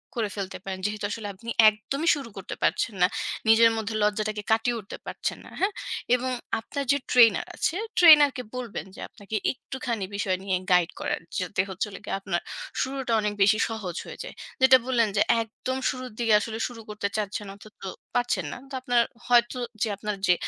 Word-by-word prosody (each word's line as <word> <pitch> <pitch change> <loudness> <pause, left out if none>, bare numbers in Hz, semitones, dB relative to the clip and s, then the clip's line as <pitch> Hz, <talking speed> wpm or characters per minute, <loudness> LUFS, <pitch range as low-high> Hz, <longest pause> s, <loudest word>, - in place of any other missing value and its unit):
করে 225 -3 0
ফেলতে 190 -1 -4
পারেন। 190 -1 -4
যেহেতু 210 0 -2
আসলে 215 -2 -4
আপনি 230 +5 -9 0.2
একদমই 245 +9 -4
শুরু 275 -5 -7
করতে 190 - -6
পারছেন 220 - +1
না। 180 - +7 0.4
নিজের 230 +1 +7
মধ্যে 220 0 -3
লজ্জাটাকে 210 0 0
কাটিয়ে 230 +2 +2
উঠতে 200 - -9
পারছেন - - -3
না, - - -11
হ্যাঁ? 400 +2 +1 0.4
এবং 255 +1 -2 0.3
আপনার 280 +5 -4
যে 280 - +3
trainer 230 -4 +6
আছে 325 - 0 0.2
trainer 305 -4 +9
কে 250 - -4
বলবেন 245 -4 -5
যে - - -12
আপনাকে 205 +1 -8 0.2
একটুখানি 245 -5 -4
বিষয় 190 -2 0
নিয়ে 190 -2 +1
guide 180 -1 +4
করার, - - -2 0.2
যাতে 185 +1 0
হচ্ছে 190 +2 -2
হলো 195 - -9
গিয়ে - - -2
আপনার 190 -3 -1 0.4
শুরুটা 265 -2 -2
অনেক 210 0 -1
বেশি 205 +2 +5
সহজ 205 -6 -5
হয়ে - - -9
যায়। - - -9 0.3
যেটা 260 0 +8
বললেন 245 -3 +2
যে - - +4 0.2
একদম 245 +4 -4
শুরুর 255 0 -5
দিকে 230 -2 +3
আসলে 220 +1 -4
শুরু 235 -2 -10
করতে 210 -1 -2
চাচ্ছেন 210 0 -3
অথচ 210 +1 -15
তো - - -4 0.3
পারছেন 245 -8 +1
না। - - -7
তো - - -12
আপনার 245 -2 +3 0.3
হয়তো 240 0 +4 0.2
যে 230 - +3
আপনার 210 0 -3
যে 180 - +7
220 Hz, 190 wpm, -26 LUFS, 205-250 Hz, 0.4 s, trainer